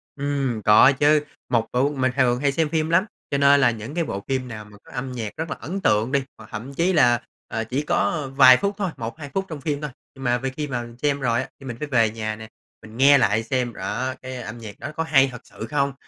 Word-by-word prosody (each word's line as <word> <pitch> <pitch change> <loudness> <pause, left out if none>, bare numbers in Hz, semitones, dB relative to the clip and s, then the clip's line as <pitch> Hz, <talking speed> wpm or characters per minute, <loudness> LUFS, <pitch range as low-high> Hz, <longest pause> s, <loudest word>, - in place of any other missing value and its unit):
Ừm, 140 -5 -2
có 105 +5 +7
chứ. 150 0 +4 0.3
Một 115 -2 +1
củ 130 +3 +2
mình 130 -1 +1
thường 125 -2 +2
hay 140 +1 +2
xem 155 +2 0
phim 160 0 0
lắm, 170 +4 +3 0.3
cho 140 - +1
nên 140 0 +5
là 120 -2 +5
những 115 +4 -7
cái 170 - +1
bộ 100 -10 -5
phim 130 -2 -1
nào 110 -3 -8
mà 105 0 -16
có - - -17
âm 130 +1 -4
nhạc 115 -4 -5
rất 160 0 -3
là - - -3
ấn 195 +5 -5
tượng 110 - +2
đi, 140 -2 +2
hoặc 110 -1 -14
thậm 120 +6 -6
chí 175 +5 +1
là, 120 -7 +4 0.3
ờ, 115 - -3
chỉ 125 +5 -2
có 150 -1 0
vài 130 -2 +8
phút 200 0 -1
thôi, 200 -3 -1
1-2 120 +6 -6
phút 195 0 -1
trong 155 -4 -7
phim 145 -1 -2
thôi, 150 - -3 0.3
nhưng 135 - -10
mà 120 -1 +2
về 135 +1 -3
khi 150 +3 -4
mà 125 -3 -2
mình 120 0 -10
xem 145 -1 +1
rồi 120 -1 +1
á, - - -7
thì 135 - -12
mình 120 -3 -6
phải 150 - -4
về 115 -5 +3
nhà 110 -1 -4
nè, 110 0 -10 0.3
mình 110 +1 -12
nghe 140 +2 +7
lại 110 -3 +2
xem, 125 -1 -1
đó, 125 +7 -3
cái 130 0 -7
âm 115 +2 -7
nhạc 105 -3 -10
đó - - -6
có 160 - -1
hay 135 -4 +4
thật 125 - -9
sự 110 - -9
không. 140 -2 0
130 Hz, 270 wpm, -23 LUFS, 115-145 Hz, 0.3 s, vài